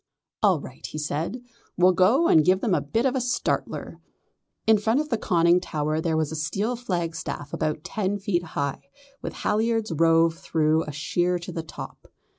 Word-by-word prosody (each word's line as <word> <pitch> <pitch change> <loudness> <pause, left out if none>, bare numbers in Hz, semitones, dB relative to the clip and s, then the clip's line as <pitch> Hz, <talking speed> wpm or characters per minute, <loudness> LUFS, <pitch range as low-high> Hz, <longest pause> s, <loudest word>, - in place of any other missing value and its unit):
"All - - +4
right," - - -11
he - - -6
said, 155 - -3 0.3
"we'll 180 +1 +6
go 210 - +4
and 155 - +6
give 185 +3 +3
them 220 - +1
a 155 - +2
bit 225 - -1
of 265 0 +1
a 260 - +1
startler." 245 +2 -2 0.7
In 220 -1 +5
front 225 +5 +2
of 305 0 -2
the 230 - +1
conning 170 0 +3
tower 155 -2 -2
there 160 -1 0
was 155 -1 0
a - - -4
steel 195 +10 -1
flagstaff 170 - -4
about 155 -1 -2
ten 205 -2 -2
feet 195 -3 0
high, 140 -4 -4 0.3
with - - -5
halliards 225 -1 0
rove 165 +1 +4
through 160 0 +1
a 150 - -5
sheer 175 +5 0
in 175 +1 -8
the 165 - -3
top. 160 - -10
175 Hz, 185 wpm, -25 LUFS, 155-210 Hz, 0.7 s, we'll